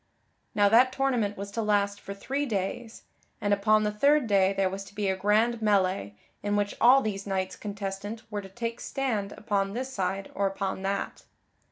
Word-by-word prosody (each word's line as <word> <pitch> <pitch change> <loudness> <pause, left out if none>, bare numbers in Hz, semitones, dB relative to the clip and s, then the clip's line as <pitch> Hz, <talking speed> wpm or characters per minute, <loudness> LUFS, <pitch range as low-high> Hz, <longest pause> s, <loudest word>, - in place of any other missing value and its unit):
Now 205 -1 +5
that 240 +5 +5
tournament 250 -6 0
was 200 +1 -6
to 225 - -2
last 205 -1 +1
for 200 - -7
three 275 +8 -2
days, 220 +2 -4 0.4
and 205 0 +1
upon 215 +1 +3
the 210 - 0
third 285 +6 +3
day 195 -3 +3
there 195 -1 +1
was 195 +1 -4
to 200 - -15
be 205 -1 -1
a 190 - +1
grand 215 +4 +2
melee 190 - +1 0.3
in 205 0 -1
which 205 0 0
all 260 +3 +7
these 200 -2 -3
knights 190 -1 -2
contestant 205 +1 -5
were 205 -1 -2
to 195 - -11
take 230 +3 -4
stand 220 -7 -2
upon 200 -2 -1
this 260 +3 -4
side 195 -2 -2
or 200 0 +1
upon 195 -1 -3
that. 195 +1 -3
205 Hz, 190 wpm, -28 LUFS, 195-225 Hz, 0.4 s, all